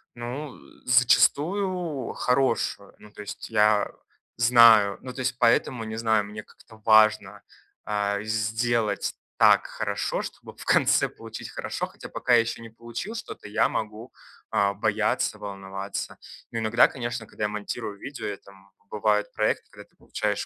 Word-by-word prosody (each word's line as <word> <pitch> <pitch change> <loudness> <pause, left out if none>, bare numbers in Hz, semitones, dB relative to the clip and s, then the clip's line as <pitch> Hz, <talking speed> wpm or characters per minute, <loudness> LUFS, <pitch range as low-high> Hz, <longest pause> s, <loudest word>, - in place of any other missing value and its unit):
Ну, 125 +5 -6
э, - - -16 0.3
зачастую 155 - +2
хорошую. 130 +1 0
Ну, 105 - -15
то 105 - -10
есть 105 - -8
я 105 -2 +3 0.5
знаю, 115 -4 +6
ну, 125 - -8
то 130 - -10
есть 130 0 -1
поэтому, 120 -1 +2
не 110 0 -6
знаю, 110 -2 +2
мне 105 +1 -8
как-то 110 0 -19
важно, 110 -2 +4 0.4
а, 100 -1 -1
сделать 110 0 0 0.2
так - - +5
хорошо, - - -2
чтобы - - -9
в - - -11
конце - - +3
получить - - -9
хорошо, - - -4
хотя - - -12
пока 125 - 0
я 120 - +8
ещё 115 0 -5
не 115 - -10
получил 120 - -7
что-то, 225 - -8
я 105 - +2
могу, 110 +3 -5 0.4
а, 100 0 +2
бояться, 100 - 0
волноваться. 100 -1 -6 0.3
Но 115 - -3
иногда, 115 +2 +4
конечно, 120 -2 -5
когда 105 - -7
я 105 - +1
монтирую 105 0 -5
видео, 140 +7 -7
это, 100 -1 -8
м, 95 0 -21 0.2
бывают 105 0 0
проекты, - - 0
когда - - -13
ты - - -37
получаешь - - -3
110 Hz, 155 wpm, -26 LUFS, 105-120 Hz, 0.5 s, я